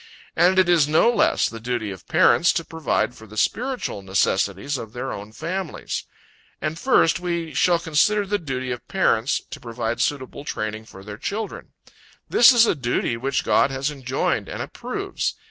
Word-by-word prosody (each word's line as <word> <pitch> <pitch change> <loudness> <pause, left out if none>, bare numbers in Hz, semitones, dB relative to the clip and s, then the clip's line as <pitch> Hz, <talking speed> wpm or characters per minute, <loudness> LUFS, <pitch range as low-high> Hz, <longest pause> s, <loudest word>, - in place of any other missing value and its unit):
And 185 +2 +4
it 185 -1 +5
is 170 -5 +4
no 160 +10 +4
less - - +2
the 115 - -8
duty 115 -3 -3
of 95 - -11
parents 170 - +4
to 165 - -2
provide 160 -5 -1
for 110 -3 -14
the 110 +1 -12
spiritual 250 - -1
necessities 100 +6 0
of 110 -1 -8
their 130 +2 -4
own 105 +1 -8
families. 175 +7 -4 0.5
And 155 +2 -3
first 255 -9 +3
we 170 -3 -3
shall 170 +4 +3
consider 200 +6 +2
the 205 +1 -1
duty 130 -5 -4
of 125 - -6
parents, 140 - +1
to - - -7
provide 115 -1 -3
suitable 140 -1 -2
training 110 -5 -4
for 95 -3 -13
their 105 +1 -9
children. 210 - -5 0.5
This 240 - +7
is 235 -2 +6
a - - +2
duty 120 -4 -1
which 135 +4 -1
God - - +3
has 135 +2 -2
enjoined 130 -2 -2
and - - -4
approves. - - -4
140 Hz, 175 wpm, -23 LUFS, 115-175 Hz, 0.5 s, This